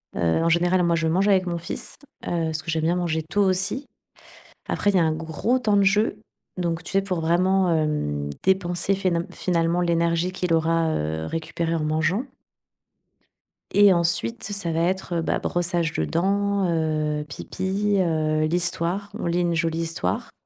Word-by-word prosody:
Heu, - - -4 0.2
en - - +2
général, 175 +2 +3
moi, 170 -1 +2
je 160 0 0
mange 185 +5 +2
avec 190 -2 +3
mon 170 -1 -1
fils. 170 - -6 0.3
Heu, - - -1 0.2
parce 160 0 -3
que - - -9
j'aime 160 0 -1
bien 170 +2 +2
manger 160 -3 -1
tôt 200 +6 0
aussi. 195 +9 0 0.8
Après, 205 - 0
il 190 - +2
y - - +5
a - - +4
un 160 -1 +1
gros 165 - -1
temps 210 -4 +2
de 200 - +4
jeu, 205 +1 +2 0.4
donc 170 -2 -1
tu - - -8
sais, 195 - +4
pour 185 -4 -2
vraiment, 185 +2 +2
hem, 150 - -1
dépenser 190 0 +1
fénal 180 -3 0
finalement 170 -1 0
l'énergie 170 +1 +1
qu'il 180 -2 -1
aura, 165 0 +2
heu, 80 - -2
récupérée 165 - -2
en 155 - -1
mangeant. 160 +9 0 1.5
Et 205 -1 +6
ensuite, 175 +7 +1
ça 200 -5 -3
va 165 - 0
être, 185 0 -1
heu, 165 - 0
bah, - - 0
brossage 175 -2 -1
de - - 0
dents, 200 +3 0
heu, 155 -2 -1
pipi, 195 +7 -2
heu, 155 -3 +1
l'histoire, 175 +3 -1
on - - -3
lit 170 +1 +1
une 175 -1 +1
jolie 165 0 0
histoire. 165 - -3
170 Hz, 180 wpm, -24 LUFS, 160-190 Hz, 1.5 s, Et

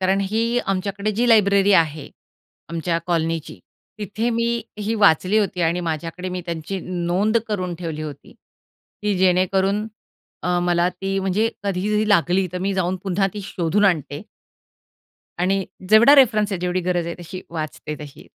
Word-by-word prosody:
कारण 190 +1 +2
ही 225 +5 0
आमच्याकडे 200 +2 -1
जी 240 +4 +1
लायब्ररी 200 -3 +5
आहे. 155 -4 +2 0.6
आमच्या 170 0 -1
कॉलनीची, 165 -2 -2 0.4
तिथे 215 +3 -2
मी 235 0 0 0.2
ही 210 +2 -1
वाचली 200 -1 +4
होती. 190 -4 -1
आणि 170 +2 +1
माझ्याकडे 165 +2 -4
मी 180 0 -4
त्यांची 170 +3 -4
नोंद 180 +5 0
करून 185 -4 -2
ठेवली 165 -3 -5
होती. 150 -3 -9 0.7
की 210 -1 +1
जेणेकरून 190 +3 +2 0.6
अ, 180 0 +1
मला 175 0 +2
ती 195 +2 -3
म्हणजे 195 +4 +1 0.2
कधी 195 0 -1
जरी 210 0 +1
लागली, 185 -1 +3
तर 180 - -3
मी 195 +2 -1
जाऊन 185 0 0
पुन्हा 195 0 +1
ती 210 - -5
शोधून 190 +1 0
आणते. 155 -4 0 1.2
आणि 190 +2 +1 0.2
जेवढा 225 +7 +7
रेफरन्स 215 -7 +4
आहे, 190 - -2
जेवढी 180 0 -1
गरज 175 -1 -1
आहे, 170 - -4
तशी 180 +2 -7
वाचते 155 -2 -5
तशी. 145 -2 -11
185 Hz, 155 wpm, -22 LUFS, 175-205 Hz, 1.2 s, जेवढा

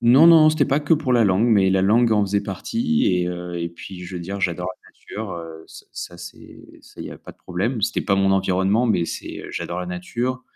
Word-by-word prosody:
Non, 130 +7 +6
non 160 -2 +7
c'était 155 - +2
pas 140 +2 +1
que 150 +2 +3
pour 145 -4 -1
la 120 -2 +4
langue 100 +4 +2
mais 100 -5 +4
la 95 0 +2
langue 115 +4 +3
en 105 - +3
faisait 100 +1 0
partie 230 - -1
et, 90 -1 +1
heu, 90 0 -5
et 85 - -2
puis 90 +2 -10
je 90 +1 -7
veux - - -5
dire 100 +3 -6
j'adore 90 -1 -1 0.2
la - - -19
nature, 85 -6 -8
ç 80 0 -13
ça 85 - -8
c'est, 90 0 -12 0.2
ça - - -15
il - - -6
y - - -8
a - - -12
pas - - -12
de - - -34
problème. 105 +7 -3
C'était 115 +2 0
pas 100 - +1
mon 95 0 +3
environnement 95 +4 +1
mais 95 -7 +1
c'est, - - -7
j'adore 85 +1 -4
la 90 - -5
nature. 120 +9 -4
95 Hz, 245 wpm, -22 LUFS, 90-120 Hz, 0.2 s, non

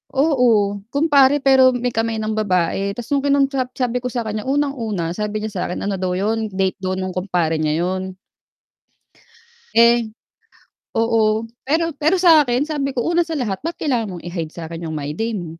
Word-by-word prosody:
oo, 245 -8 +2
kumpare 285 0 +3
pero 260 -2 +5
may 245 0 -1
kamay 225 0 -1
ng 215 - -2
babae? 195 0 0
Tas 240 +1 -8
nung 285 - +3
kinausap 275 -2 +1
sabi 250 -1 -1
ko 250 - -4
sa 245 -1 -3
kan'ya, 215 +1 -4
unang-una 240 - -1
sabi 210 +3 -3
niya 220 - -4
sa 190 -3 -4
akin 180 - -4
ano 200 -2 -2
daw 180 -1 -1
yun 220 +3 -1
date 190 -1 -2
daw 185 0 -2
nung 185 0 -3
kumpare 180 -4 -1
niya 155 -1 0
yun. 185 +1 -3 1.6
Eh 235 -1 +4 0.9
oo, 225 -1 +2 0.2
pero 325 +4 0
pero 310 +6 +1
sa 330 -4 +7
akin 250 +2 0
sabi 290 -3 -2
ko 250 -3 -2
una 345 +1 +2
sa 325 -3 -4
lahat 205 -7 -3
ba't 335 +2 -4
kailangan 240 -9 -1
mong 175 -1 -8
i-hide 170 -3 -4
sa'kin 165 0 -8
yung 160 -1 -4
my 145 0 -4
day 225 +7 -2
mo? 175 - -6
225 Hz, 185 wpm, -20 LUFS, 190-270 Hz, 1.6 s, sa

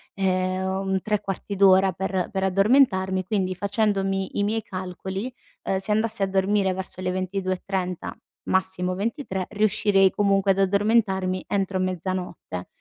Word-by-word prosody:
ehm, 185 -1 0
un 190 0 -1
3/4 200 -1 -3
d'ora 190 -1 +5
per 190 0 -2
per 190 -1 -1
addormentarmi, 190 -2 +3
quindi 185 -2 -1
facendomi 195 -2 -1
i 205 - +2
miei 220 +2 0
calcoli, 190 +5 -5 0.3
uhm, 190 - 0
se 195 +3 -3
andassi 220 -1 0
a 195 - +2
dormire 195 0 +1
verso 185 0 -7
le 185 0 -1
22:30, 185 -1 -3 0.4
massimo 190 -1 0
23, 200 - -3
riuscirei 205 -2 +3
comunque 195 -1 +2
ad 195 - 0
addormentarmi 195 -2 +2
entro 195 -1 -1
mezzanotte, 185 - -4
190 Hz, 130 wpm, -24 LUFS, 185-200 Hz, 0.4 s, d'ora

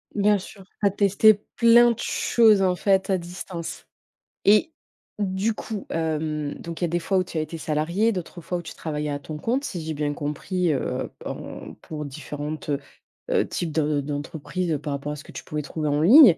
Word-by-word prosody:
Bien 205 0 +4
sûr. 195 +1 -11
Tu 200 - -5
as - - +4
testé 205 +2 +5 0.2
plein 235 0 +7
de 235 - -4
choses, 220 -4 +4
en 185 -1 +3
fait, 190 0 +2
à 190 - +3
distance? 175 -1 -7 0.6
Et 210 +10 +5 0.5
du 200 +2 0
coup, 215 -2 -6
hem, 155 -2 -1
donc 170 +1 -7
il - - 0
y - - +5
a - - 0
des 175 +1 +1
fois 190 +3 0
où 185 - +3
tu 170 - -7
as - - +2
été 155 +2 -5
salariée, 165 +9 +1
d'autres 180 -2 -5
fois 180 +3 -2
où - - -4
tu 160 - -9
travaillais 150 -2 -3
à 145 0 -2
ton 150 +1 -7
compte, 250 - 0
si 175 - -4
j'ai 160 0 -3
bien 145 0 -1
compris, 155 +4 -1
heu, 135 - -2 0.2
en - - -6
pour 150 -2 -6
différents, 150 +1 -5 0.7
heu, - - +3
types 170 -3 -3
de 150 -2 +1
d'entreprises, 150 +4 -3
heu, 150 - 0
par 145 -1 -3
rapport 145 +1 -3
à - - -5
ce 150 - -10
que - - -13
tu - - -8
pouvais 150 0 -3
trouver 150 +2 -3
en 145 +1 +2
ligne. 225 - +9
170 Hz, 215 wpm, -25 LUFS, 150-195 Hz, 0.7 s, ligne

